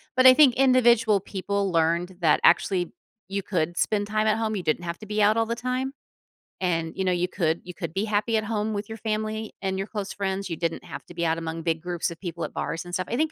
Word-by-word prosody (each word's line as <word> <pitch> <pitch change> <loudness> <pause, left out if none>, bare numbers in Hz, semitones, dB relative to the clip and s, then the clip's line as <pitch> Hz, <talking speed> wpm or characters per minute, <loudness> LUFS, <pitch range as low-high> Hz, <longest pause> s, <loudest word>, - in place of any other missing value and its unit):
But 255 0 +4
I 255 - +11
think 265 -3 +6
individual 240 -5 +4
people 200 0 -2
learned 170 +2 +1
that 155 -3 +4
actually 180 -3 +3 0.4
you 200 +1 -2
could 175 -3 -1
spend 205 -1 +1
time 215 +1 +1
at 215 - +3
home, 220 -1 -1
you 185 - -3
didn't 155 +2 0
have 170 -1 -4
to 215 - -9
be 210 0 -1
out 210 +2 +4
all 225 - +3
the 235 - -2
time. 255 +2 -2 0.7
And, 165 -3 0
you 190 - -1
know, 185 - +2
you 180 0 +1
could 170 -3 -1
you 180 - -8
could 170 -3 -6
be 200 - 0
happy 215 +1 +1
at 215 - 0
home 215 0 -1
with 205 0 -3
your 220 - -6
family 215 0 -3
and 190 0 -1
your 195 - -3
close 205 -3 -5
friends, 195 -1 -2
you - - -1
didn't 165 0 -2
have - - -8
to 175 - -11
be 170 0 -1
out 160 0 +1
among 165 0 -5
big 165 -2 0
groups 175 -1 -2
of 170 - -9
people 170 -3 -5
at - - -5
bars 165 +2 -3
and 175 - -9
stuff. 185 0 -1
I 235 - -1
think 315 0 +1
195 Hz, 260 wpm, -25 LUFS, 175-220 Hz, 0.7 s, I